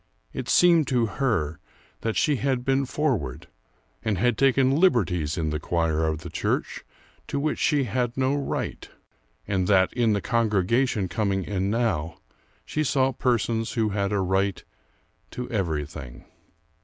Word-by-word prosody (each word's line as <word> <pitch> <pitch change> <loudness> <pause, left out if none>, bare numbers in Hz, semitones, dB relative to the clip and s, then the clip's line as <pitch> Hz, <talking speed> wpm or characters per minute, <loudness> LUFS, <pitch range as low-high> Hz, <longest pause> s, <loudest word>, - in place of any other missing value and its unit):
It - - -5
seemed 170 -4 +5
to 125 -3 +2
her 100 - -1 0.4
that 115 -1 -2
she 150 -3 +2
had 130 -1 -1
been 135 0 +1
forward, 120 - -1 0.6
and 110 -4 0
had 120 +4 +2
taken 135 +1 +3
liberties 90 - +2
in 80 -2 -1
the 75 - -2
choir 80 -1 0
of 80 0 -2
the 85 0 -8
church - - -2 0.4
to 140 - -2
which 150 +1 -1
she 145 -3 +2
had 120 +1 -2
no 130 +1 +2
right; 145 -1 -3 0.6
and 95 -2 0
that 95 -2 +3
in 115 -3 +2
the 100 - +1
congregation 110 0 +1
coming 95 +1 -1
in 95 0 -2
now, 100 -8 -1 0.5
she 155 - -1
saw 135 -2 +2
persons 115 -3 0
who 110 -2 +1
had 100 0 -1
a 100 -1 +1
right 95 +1 0 0.7
to 125 0 -6
everything. 75 - -4
110 Hz, 150 wpm, -25 LUFS, 90-130 Hz, 0.7 s, seemed